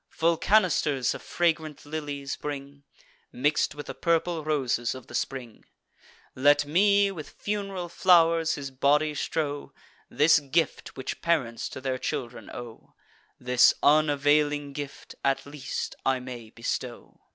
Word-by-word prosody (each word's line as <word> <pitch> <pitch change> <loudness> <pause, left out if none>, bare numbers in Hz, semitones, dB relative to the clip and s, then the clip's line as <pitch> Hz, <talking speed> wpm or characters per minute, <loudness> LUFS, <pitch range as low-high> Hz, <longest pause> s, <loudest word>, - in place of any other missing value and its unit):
Full 165 +1 +1
canisters 160 - +2
of - - -8
fragrant 160 -4 -1
lilies 145 -2 -4
bring, 140 -1 -7 0.5
Mix'd 145 +4 +1
with 145 - -7
the - - -6
purple 165 -1 0
roses 130 -6 0
of 130 - -10
the - - -14
spring; 125 -4 -4 0.7
Let 145 +2 +4
me 200 +5 +4
with 165 -6 -8
fun'ral 195 -3 -4
flow'rs 165 -2 +4
his 140 -2 -6
body 145 +3 +2
strow; 145 0 -3 0.4
This 150 +1 +5
gift 150 +3 -1
which 130 - -5
parents 130 -9 0
to 130 - -8
their 130 -1 -2
children 120 -1 -4
owe, 120 -2 -10 0.4
This 125 0 +4
unavailing 145 -1 +3
gift, 145 -1 -7
at 135 -1 +1
least, 140 -2 -5
I 130 -1 +1
may 125 -3 -8
bestow!" 120 +1 -5
145 Hz, 130 wpm, -27 LUFS, 135-160 Hz, 0.7 s, This